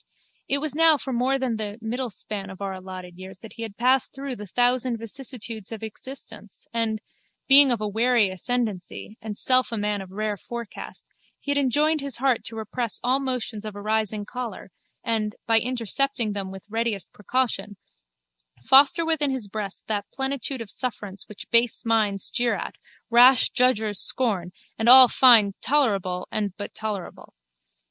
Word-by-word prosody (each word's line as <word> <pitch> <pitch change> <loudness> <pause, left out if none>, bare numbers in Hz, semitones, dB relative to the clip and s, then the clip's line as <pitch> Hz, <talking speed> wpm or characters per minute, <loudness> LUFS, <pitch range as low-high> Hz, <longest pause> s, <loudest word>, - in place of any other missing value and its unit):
It 275 - +2
was 295 -1 -2
now 320 0 +5
for 265 -1 -5
more 255 +3 +1
than 255 -4 -2
the 210 -1 -5
middle 240 +3 -3
span 200 -1 -6
of 190 - -11
our 195 -1 -4
allotted 185 -1 -9
years 190 0 -10
that 225 - -11
he - - -10
had 220 -3 -6
passed 255 +2 +2
through 270 -1 -6
the 210 -2 -9
thousand 245 +3 +1
vicissitudes 230 -2 -6
of 225 -1 -7
existence 220 -2 -7
and, 225 -2 -1 0.5
being 275 0 +10
of 235 - +1
a 210 - -2
wary 225 0 +2
ascendancy 215 0 -3
and 215 -2 -6
self 255 -1 +3
a 230 - -2
man 205 -1 -1
of 190 - -10
rare 210 +2 -3
forecast, 235 +1 -8 0.3
he 285 - -4
had 285 - 0
enjoined 295 +3 +1
his 280 -3 -2
heart 255 -1 +1
to 225 - -3
repress 225 +1 -3
all 255 +2 +2
motions 250 -5 -4
of 215 -2 -7
a 205 - -8
rising 215 -1 -1
choler 230 -5 -7 0.3
and, 215 -2 -1
by 225 -1 +4
intercepting 245 0 -1
them 195 -2 -4
with 190 0 -10
the 205 - -29
readiest 225 -3 -2
precaution, 210 -2 -2 0.9
foster 285 - +5
within 315 -3 +1
his 260 -6 -3
breast 200 -1 -6
that 205 -2 -3
plenitude 270 -1 -1
of 220 - -7
sufferance 205 -6 -4
which 205 -2 -10
base 235 0 +2
minds 215 -4 +1
jeer 240 0 0
at, - - -6 0.4
rash 245 +1 +6
judgers 220 -5 +2
scorn 195 -9 +1 0.3
and 225 +2 +2
all 255 0 +10
find 230 -5 +6
tolerable 195 -11 0
and 205 -3 -3
but 205 - -7
tolerable. 210 -4 -6
225 Hz, 170 wpm, -24 LUFS, 205-255 Hz, 0.9 s, being